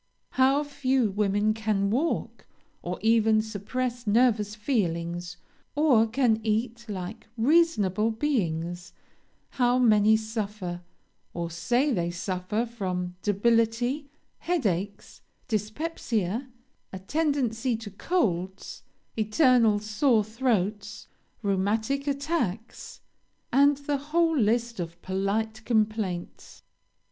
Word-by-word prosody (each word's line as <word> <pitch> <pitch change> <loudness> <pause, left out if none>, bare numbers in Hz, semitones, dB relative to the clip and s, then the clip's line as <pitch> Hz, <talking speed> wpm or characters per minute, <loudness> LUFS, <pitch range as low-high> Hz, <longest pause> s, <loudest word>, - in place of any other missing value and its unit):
How 270 +3 +3
few 265 -6 0
women 205 +1 +1
can 210 -3 0
walk, 290 +9 -2 0.3
or 180 +1 -4
can 220 0 +3
suppress 235 +3 -3
nervous 215 -2 +2
feelings, 175 -7 -2 0.4
or 270 -7 +4
can 225 -2 +1
eat 230 +2 -2
like 190 0 -6
reasonable 225 - +3
beings: 175 - -2 0.6
how 245 -1 +2
many 220 -3 +5
suffer, 210 -5 -4 0.5
or 170 -1 -3
say 250 - +1
they 170 -4 0
suffer 185 +5 -2
from 185 -6 -4
debility, 230 +6 +1 0.3
headaches, 200 - -2 0.3
dyspepsia, 225 - -2 0.4
a 190 - -6
tendency 255 0 0
to 220 -2 -9
colds, 190 - -2 0.3
eternal 225 0 +4
sore 215 +2 +2
throats, 210 -3 -2 0.4
rheumatic 220 +8 0
attacks, 275 - -3 0.5
and 280 +2 +5
the 285 0 -2
whole 325 +4 +1
list 235 -2 +1
of 170 0 -5
polite 215 +4 -2
complaints! 215 -6 -2
220 Hz, 95 wpm, -27 LUFS, 200-255 Hz, 0.6 s, many